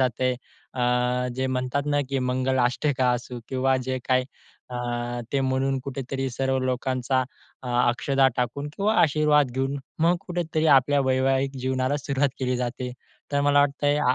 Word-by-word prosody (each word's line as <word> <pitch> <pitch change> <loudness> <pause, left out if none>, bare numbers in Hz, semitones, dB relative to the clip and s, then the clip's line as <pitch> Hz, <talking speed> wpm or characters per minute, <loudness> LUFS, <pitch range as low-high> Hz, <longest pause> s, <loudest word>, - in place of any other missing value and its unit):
जातय. 130 0 +1 0.4
अ, 125 - -2 0.5
जे 130 0 0
म्हणतात 130 +2 -1
ना, 145 0 +2
की 135 -1 -1
मंगल 130 +1 0
अष्टका 130 0 +1
असू 120 0 -4
किंवा 130 0 +1
जे 130 0 0
काही 130 0 +3 0.5
अ, 125 - -4 0.6
ते 140 - +2
म्हणून 135 0 0
कुठेतरी 135 0 -3
सर्व 135 +2 0
लोकांचा 130 0 0 0.4
अ, 125 - -6 0.2
अक्षदा 135 +2 +2
टाकून 125 +4 -2
किंवा 210 +2 +1
आशीर्वाद 150 -3 +3
घेऊन, 135 +2 -1 0.2
मग 170 +2 +4
कुठेतरी 165 -3 -1
आपल्या 140 +2 +4
वैवाहिक 135 +1 +1
जीवनाला 130 +2 0
सुरुवात 140 0 0
केली 125 -1 0
जाते. 125 0 -3 0.4
तर 140 - +2
मला 145 0 +4
वाटतंय 145 +1 +1
130 Hz, 150 wpm, -25 LUFS, 130-140 Hz, 0.6 s, मग